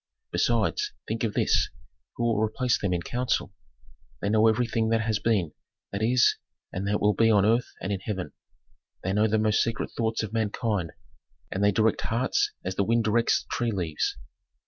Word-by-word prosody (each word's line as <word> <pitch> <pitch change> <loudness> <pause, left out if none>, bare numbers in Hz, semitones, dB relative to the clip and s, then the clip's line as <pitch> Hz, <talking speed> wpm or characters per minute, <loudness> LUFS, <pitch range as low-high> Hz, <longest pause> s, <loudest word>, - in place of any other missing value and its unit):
Besides, 420 0 +1
think 110 +1 -2
of 110 -3 -1
this: - - +2 0.5
Who 120 - -3
will 115 -3 +1
replace 120 +3 0
them 100 - 0
in 85 -1 -1
counsel? 125 +5 -1 0.7
They 100 - -1
know 110 +1 +4
everything 110 0 +1
that 115 0 +2
has 110 -2 0
been, 100 -7 +1 0.4
that 100 - -3
is, 120 +2 +4 0.4
and 95 +2 -3
that 105 +1 +1
will 105 +1 +3
be 115 +1 +3
on 100 -3 +4
earth 115 +3 +2
and 100 - -1
in 95 - -2
heaven; 95 -6 -4 0.7
they 95 - -1
know 105 +2 +3
the 110 +1 +1
most 110 0 +2
secret 115 0 -2
thoughts 115 -1 -1
of 110 - -5
mankind, 105 -5 -1 0.6
and 95 - -1
they 105 - +5
direct 110 +2 +2
hearts 265 - 0
as - - -2
the 100 - +3
wind 115 +3 +2
directs 115 +2 +2
tree 120 -1 0
leaves. 85 - -2
110 Hz, 185 wpm, -27 LUFS, 100-115 Hz, 0.7 s, they